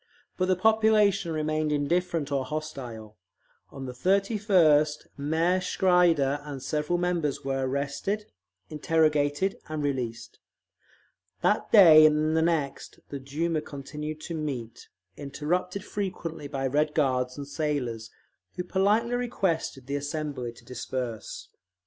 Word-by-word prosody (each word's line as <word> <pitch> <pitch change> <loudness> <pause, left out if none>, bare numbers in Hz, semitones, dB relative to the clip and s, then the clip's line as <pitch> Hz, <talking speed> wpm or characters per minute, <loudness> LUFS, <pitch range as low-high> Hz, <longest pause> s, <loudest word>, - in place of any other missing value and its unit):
But 185 - 0
the 185 - +3
population 215 -3 +3
remained 155 0 -1
indifferent 160 +1 0
or 135 -2 0
hostile. 130 -7 -6 0.5
On 135 -1 -8
the 130 - -5
31st 185 - +3
Mayor 160 +6 +1
Schreider 170 -7 +3
and 140 -3 -7
several 150 +3 -1
members 175 -6 -1
were 135 -1 -1
arrested, 140 +10 -2 0.4
interrogated, 155 +2 +1
and 155 -1 -3
released. 125 -5 -3 1.0
That 210 - +1
day 160 -7 +9
and 155 +1 +1
the 160 - +3
next 160 -5 -1
the 140 - -5
Duma 155 +4 -2
continued 150 +2 -7
to 170 - -6
meet, 130 -8 -5 0.3
interrupted 180 +7 -3
frequently 180 -7 -4
by 135 -1 -3
Red 150 +3 +1
Guards 130 -3 +1
and 140 -1 -6
sailors, 140 -7 -3 0.5
who 180 - -3
politely 205 +6 +1
requested 190 - -1
the 140 +2 -2
assembly 145 -4 -4
to 115 - -18
disperse. 125 -3 -5
150 Hz, 120 wpm, -27 LUFS, 140-180 Hz, 1.0 s, day